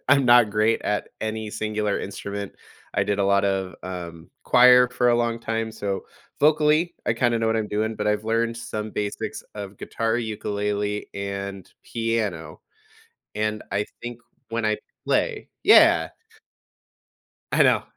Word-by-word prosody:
I'm 140 -1 +5
not 120 -3 +6
great 110 +2 +2
at 105 - -1
any 110 0 -3
singular 105 -1 -1
instrument. 100 0 -5 0.4
I - - +2
did 105 -1 -1
a 100 - +2
lot 100 0 +3
of, 95 -1 -1
um, 85 -3 -7
choir 125 0 +7
for 125 0 +1
a 120 - +4
long 115 -1 0
time, 115 -1 -2
so, 100 -3 -3 0.4
vocally, 155 +3 +3
I - - +3
kinda 120 -2 +1
know 115 - +1
what 115 - +1
I'm 110 -1 -1
doing, 110 +1 -1
but 105 - -2
I've 105 0 0
learned 115 +1 0
some 110 -2 -5
basics 105 -1 -4
of 100 -1 -7
guitar, 115 0 -1
ukulele, 105 -2 -2
and 100 -1 -5
piano. 110 -9 -3 0.7
And 105 0 -2
I 105 +1 +1 0.2
think 120 -1 -6 0.3
when 115 0 -2
I 110 0 +2 0.3
play - - 0 0.2
Yeah. - - +6 1.4
I - - +5
know. - - +4
110 Hz, 150 wpm, -24 LUFS, 100-115 Hz, 1.4 s, choir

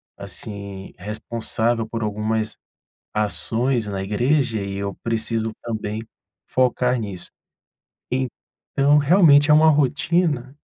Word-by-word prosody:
assim, 100 0 -6
responsável 110 +3 -2
por 115 0 -4
algumas 110 +1 -1 0.6
ações 115 +3 0
na 100 -2 -3
igreja, 120 +2 +1
e 100 0 -4
eu 100 -1 -3
preciso 115 -1 0
também 110 -1 -4 0.5
focar 125 0 +2
nisso. 100 -5 -7 0.8
Então, 135 +3 0
realmente 150 -2 +5
é - - +8
uma 155 +1 +6
rotina 145 -1 +1
115 Hz, 100 wpm, -22 LUFS, 105-135 Hz, 0.8 s, é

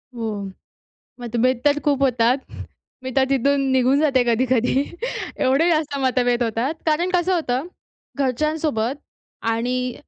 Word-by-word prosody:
हो. 215 -4 -4 0.7
मतभेद 240 +1 0
तर 290 0 +3
खूप 280 -2 +1
होतात. 250 0 +2 0.6
मी 260 - -4
तर 265 - +5
तिथून 275 +1 +2
निघून 260 +2 +3
जाते 275 -5 +3
कधी-कधी 250 +2 +2 0.5
एवढे 275 +6 +2
जास्त 305 -3 0
मतभेद 250 -2 +1
होतात. 235 +6 -1
कारण 330 +4 +1
कसं 360 +1 +2
होतं, 270 -3 -1 0.5
घरच्यांसोबत 280 -2 0 0.5
आणि 250 +2 -1
260 Hz, 120 wpm, -21 LUFS, 240-285 Hz, 0.7 s, तर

